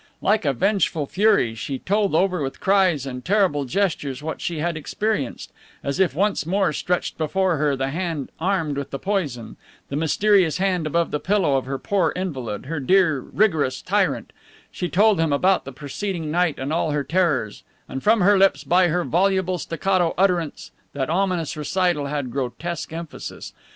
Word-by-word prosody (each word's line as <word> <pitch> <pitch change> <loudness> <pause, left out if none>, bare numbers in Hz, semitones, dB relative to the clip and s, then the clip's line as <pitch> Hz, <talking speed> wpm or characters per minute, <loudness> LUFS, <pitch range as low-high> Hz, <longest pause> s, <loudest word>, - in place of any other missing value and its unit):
Like 205 -3 +1
a 140 - +2
vengeful 185 - +1
fury 200 - +2
she 125 +4 -4
told 200 +2 0
over 180 -1 +2
with 135 -1 -4
cries 185 -8 +2
and 125 -2 -6
terrible 185 -8 +2
gestures 145 -4 -1
what 160 - -4
she 170 - -3
had 170 +2 -1
experienced, 155 - -3 0.3
as 140 +5 -2
if 185 -7 +2
once 200 +5 +1
more 185 0 +1
stretched 180 +3 -2
before 180 +2 +1
her 145 -1 +1
the 135 0 -2
hand 165 -3 -3
armed 165 -5 0
with 140 - -5
the 135 - -4
poison, 145 - -3 0.3
the 140 - -4
mysterious 175 +3 +3
hand 185 -4 0
above 170 +2 0
the 150 - -1
pillow 185 -7 +1
of 135 - 0
her 135 0 -2
poor 180 0 0
invalid, 135 - -4
her 155 +2 -3
dear, 160 0 +3
rigorous 155 -7 +1
tyrant; - - 0 0.4
she 180 - -3
told 205 +2 +4
them 165 -2 +1
about 185 +7 +2
the 135 - -7
preceding 155 +4 -4
night 175 -2 +1
and 135 +4 -3
all 165 -1 0
her 145 -1 0
terrors, 140 - 0 0.3
and 135 - -5
from 220 - +3
her 200 +2 +5
lips, 195 0 +3
by 180 +1 +4
her 175 +2 0
voluble 185 +1 +1
staccato 175 +3 0
utterance 180 -4 0 0.2
that 140 +1 -2
ominous 180 -3 0
recital 165 -1 0
had 140 -3 -3
grotesque 150 +7 -4
emphasis. 165 -1 -7
165 Hz, 175 wpm, -23 LUFS, 145-190 Hz, 0.4 s, her